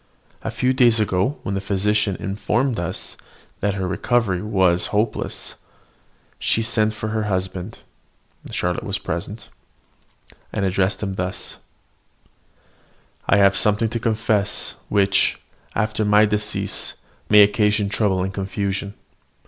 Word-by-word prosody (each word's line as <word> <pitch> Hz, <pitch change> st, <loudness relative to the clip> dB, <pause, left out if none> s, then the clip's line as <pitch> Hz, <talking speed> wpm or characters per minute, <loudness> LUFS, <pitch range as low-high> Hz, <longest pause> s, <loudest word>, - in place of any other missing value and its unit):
A -, -, -3 dB
few 125 Hz, +3 st, +1 dB
days 120 Hz, -3 st, +4 dB
ago, 105 Hz, +6 st, +1 dB
when 100 Hz, -, -3 dB
the 95 Hz, -, -1 dB
physician 100 Hz, +1 st, +1 dB
informed 110 Hz, +6 st, -1 dB
us 85 Hz, -, -4 dB, 0.4 s
that 100 Hz, 0 st, 0 dB
her 95 Hz, -2 st, -2 dB
recovery 100 Hz, -1 st, +1 dB
was 95 Hz, -4 st, +2 dB
hopeless, 105 Hz, +1 st, -2 dB, 0.9 s
she 115 Hz, -, +1 dB
sent 110 Hz, -2 st, +1 dB
for 110 Hz, 0 st, -4 dB
her 110 Hz, 0 st, -1 dB
husband 95 Hz, 0 st, -3 dB, 0.7 s
(Charlotte -, -, -1 dB
was -, -, -1 dB
present), -, -, -5 dB, 1.0 s
and 100 Hz, -, -1 dB
addressed 95 Hz, +2 st, 0 dB
him 95 Hz, -2 st, -2 dB
thus: 90 Hz, -1 st, -4 dB, 1.7 s
"I -, -, +6 dB
have 100 Hz, -1 st, +5 dB
something 105 Hz, +3 st, +2 dB
to 115 Hz, -, -3 dB
confess, 110 Hz, -3 st, 0 dB, 0.2 s
which, 100 Hz, -1 st, +3 dB, 0.4 s
after 110 Hz, 0 st, 0 dB
my 105 Hz, +1 st, +5 dB
decease, 105 Hz, 0 st, -2 dB, 0.3 s
may 105 Hz, 0 st, +9 dB
occasion 105 Hz, 0 st, +2 dB
trouble 100 Hz, -2 st, +1 dB
and 95 Hz, +1 st, -3 dB
confusion. 100 Hz, +1 st, -3 dB
105 Hz, 125 wpm, -22 LUFS, 95-110 Hz, 1.7 s, may